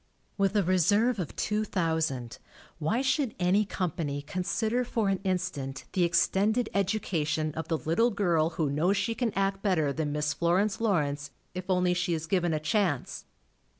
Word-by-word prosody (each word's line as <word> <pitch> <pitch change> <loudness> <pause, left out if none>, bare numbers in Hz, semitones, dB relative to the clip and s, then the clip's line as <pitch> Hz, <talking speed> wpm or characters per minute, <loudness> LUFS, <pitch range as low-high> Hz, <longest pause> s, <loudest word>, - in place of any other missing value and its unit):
With 200 0 +1
a 205 - +4
reserve 205 +6 +3
of 175 - -4
two 215 0 0
thousand, 160 - -1 0.4
why 215 - 0
should 265 -2 0
any 185 +4 +2
company 160 -7 -3
consider 215 +9 -1
for 225 -4 0
an 195 -1 0
in 185 -2 +2
stant 140 -7 -5
the 185 - +2
extended 210 +6 +2
education 165 -6 0
of 160 0 -5
the 165 - 0
little 170 +11 +2
girl 175 -7 +1
who 150 -4 +1
knows 175 +8 +2
she 230 - 0
can 235 -1 -1
act 195 0 0
better 160 -9 +1
than 155 -1 -2
Miss 150 0 0
Florence 195 +6 +1
Lawrence, 145 -9 0 0.2
if 185 +1 -6
only 180 -1 +3
she 175 -1 0
is 160 0 -4
given 175 0 +1
a 155 - 0
chance? 155 - -1
180 Hz, 170 wpm, -28 LUFS, 155-205 Hz, 0.4 s, a